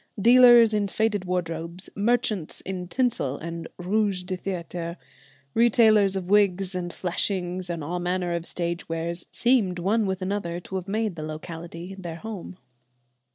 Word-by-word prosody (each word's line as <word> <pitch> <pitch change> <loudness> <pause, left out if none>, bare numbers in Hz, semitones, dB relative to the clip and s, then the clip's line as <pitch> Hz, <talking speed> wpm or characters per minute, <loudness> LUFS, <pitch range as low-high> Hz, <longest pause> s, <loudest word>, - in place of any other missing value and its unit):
Dealers 240 0 +7
in 205 -1 +1
faded 210 -1 0
wardrobes, 170 0 -3
merchants 215 -5 0
in 185 -1 -5
tinsel 215 - 0
and 165 0 -6
rouge 195 0 0
de 185 +1 -3
théâtre, 175 -2 -5 0.6
retailers 220 -4 +5
of 185 -2 -3
wigs 195 -1 +3
and 175 -1 -3
fleshings 180 0 -2
and 170 -3 -3
all 175 +4 -3
manner 180 0 -1
of 170 0 -3
stage 170 -1 -3
wares, 170 +1 -3
seemed 230 -7 +2
one 205 +4 +1
with 190 0 -2
another 185 -3 -2
to 180 - -13
have 185 0 -3
made 215 -1 -1
the 155 - -6
locality 165 +3 -7
their 170 -3 -6
home. 190 -1 -7
185 Hz, 150 wpm, -25 LUFS, 170-205 Hz, 0.6 s, Dealers